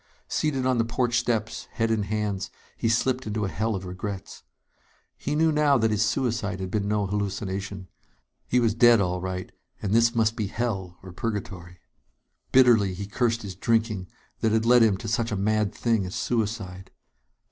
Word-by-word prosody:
Seated 135 -4 0
on 130 -2 +2
the - - +4
porch 120 +1 +1
steps, 110 -2 -2
head 115 0 0
in 110 -1 +1
hands, 100 -1 -2 0.3
he 115 - 0
slipped 125 +2 +1
into 105 0 -1
a - - -2
hell 110 +2 -1
of 95 -1 -5
regrets. 95 +2 -6 0.7
He 145 - -3
knew 160 +1 +3
now 150 -2 +4
that 110 -2 +2
his 105 0 +2
suicide 110 -4 -1
had 95 -1 -4
been 105 -2 -1
no 105 -1 +1
hallucination. 100 -1 -3 0.6
He 125 - +3
was 115 -3 +2
dead, 120 0 +6
all 90 -2 0
right; 95 0 -4 0.3
and 100 -1 -2
this 115 +1 +4
must 110 -1 +2
be 110 -4 -2
hell 95 -6 -3
or 95 - -9
purgatory. 90 -4 -5 0.7
Bitterly 115 -7 +5
he 100 +2 -5
cursed 115 +2 0
his 100 -2 -6
drinking, 110 -1 0 0.3
that 110 - +1
had 110 +1 +2
led 120 +1 +6
him 110 -4 +4
to 110 - -7
such 115 +1 0
a - - 0
mad 105 +1 +1
thing 115 -4 0
as 90 - -6
suicide. 105 -5 -2
110 Hz, 180 wpm, -26 LUFS, 100-115 Hz, 0.7 s, dead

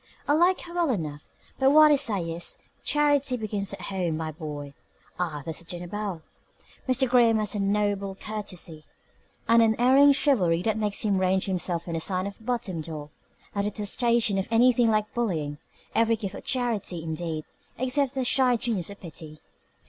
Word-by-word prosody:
"I 290 - +3
like 350 +4 +3
her 345 - -9
well 345 -3 +1
enough, 155 - -3 0.4
but 265 0 +5
what 305 +1 +7
I - - +7
say 225 -10 +2
is, 170 +1 -3 0.3
Charity 285 -3 +2
begins 205 -3 -3
at 200 - -8
home, 180 -5 -2
my 160 -1 -3
boy. 150 -3 -7 0.5
Ah, 155 -5 -2
there's 160 -1 -4
the 170 - -9
dinner 175 +1 -5
bell!" 195 -3 -5 0.7
Mr. 260 +1 +3
Graham 240 -2 +4
has 215 -1 -1
a 210 - -2
noble 200 -1 0
courtesy, 190 -7 -5 0.6
an 230 +1 +6
unerring 250 +6 +5
chivalry 185 - +2
that 220 0 0
makes 210 -2 -1
him 200 -3 +1
range 185 0 +2
himself 180 -3 -2
on 170 - -4
the 165 - -1
side 185 +2 -1
of 200 0 -6
the - - -18
bottom 230 -8 -2
dog, 150 -2 -7 0.4
a 200 - 0
detestation 210 +1 +1
of 190 - -2
anything 240 0 +4
like 215 -1 0
bullying 160 -11 -2 0.3
every 230 0 +3
gift 200 -3 -5
of - - -8
charity, 225 -9 -1
indeed, 160 -1 -4 0.3
except 260 +2 0
the 265 - 0
shy 250 0 +3
genius 215 -7 -1
of 200 - -10
pity. 155 -2 -10
205 Hz, 180 wpm, -26 LUFS, 170-245 Hz, 0.7 s, what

